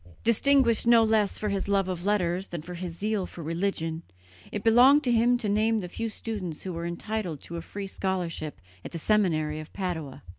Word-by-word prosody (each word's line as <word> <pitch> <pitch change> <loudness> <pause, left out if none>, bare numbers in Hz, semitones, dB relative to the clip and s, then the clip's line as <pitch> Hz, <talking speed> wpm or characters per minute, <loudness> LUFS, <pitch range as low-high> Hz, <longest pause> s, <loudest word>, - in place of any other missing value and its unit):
Distinguished 235 0 +4
no 235 -1 +7
less 215 -2 +2
for 210 - -2
his 200 -1 -2
love 195 -1 +2
of 180 -2 -4
letters 185 -2 +1
than 170 -3 -6
for 180 - -8
his 175 -1 -6
zeal 210 -1 -1
for 170 - -9
religion, 165 -1 -2 0.5
it 205 - -4
belonged 255 +6 +6
to 250 - +1
him 240 +1 +4
to 235 -3 -3
name 215 +2 +2
the 180 - -5
few 225 +6 -4
students 205 -7 -5
who 185 - -4
were 170 0 -4
entitled 175 -2 -4
to 170 - -8
a - - -4
free 200 +4 -6
scholarship 180 -5 -3 0.2
at - - -8
the - - -3
seminary 160 -6 +1
of 155 - -9
Padua. 165 -8 -4
195 Hz, 200 wpm, -27 LUFS, 170-220 Hz, 0.5 s, no